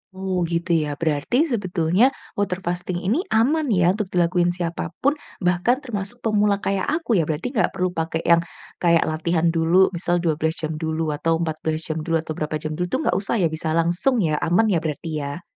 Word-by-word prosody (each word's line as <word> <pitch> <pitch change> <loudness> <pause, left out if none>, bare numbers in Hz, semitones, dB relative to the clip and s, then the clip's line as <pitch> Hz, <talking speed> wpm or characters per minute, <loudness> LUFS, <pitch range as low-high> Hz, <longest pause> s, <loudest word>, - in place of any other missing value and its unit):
Oh, 190 -1 -2
gitu 170 +1 -2
ya, 150 -3 +1
berarti 160 - +1
sebetulnya, 185 0 +2 0.3
water 190 -2 -1
fasting 175 +1 -3
ini 220 - +1
aman 290 +5 +2
ya 180 -6 +3
untuk 205 0 -2
dilakuin 175 -1 +1
siapa 170 -2 -3 0.2
pun, 290 +3 +2 0.2
bahkan 180 +10 +2
termasuk 235 0 -4
pemula 210 -2 +2
kayak 195 -1 0
aku 290 - +1
ya, 155 - 0
berarti 160 +10 -2
gak 225 -7 0
perlu 185 -1 0
pakai 165 -1 -3
yang, 170 0 +5 0.4
kayak 170 -1 +4
latihan 165 +1 0
dulu 170 +3 +3
misal 175 -1 -1
12 160 0 0
jam 155 - -1
dulu 160 -1 -1
atau 165 +2 0
14 160 -1 -2
jam 155 - -2
dulu, 165 +1 -1
atau 160 - -6
berapa 155 0 -2
jam 155 0 -4
dulu 175 +3 -2
itu - - -1
gak - - +1
usah 200 +3 -2
ya, 170 -7 +1
bisa 160 0 -2
langsung 175 +11 +2
ya, 155 -2 +1
aman 210 +6 +2
ya 170 - +2
berarti 160 +1 -4
ya? 145 +5 -5
175 Hz, 195 wpm, -22 LUFS, 160-195 Hz, 0.4 s, yang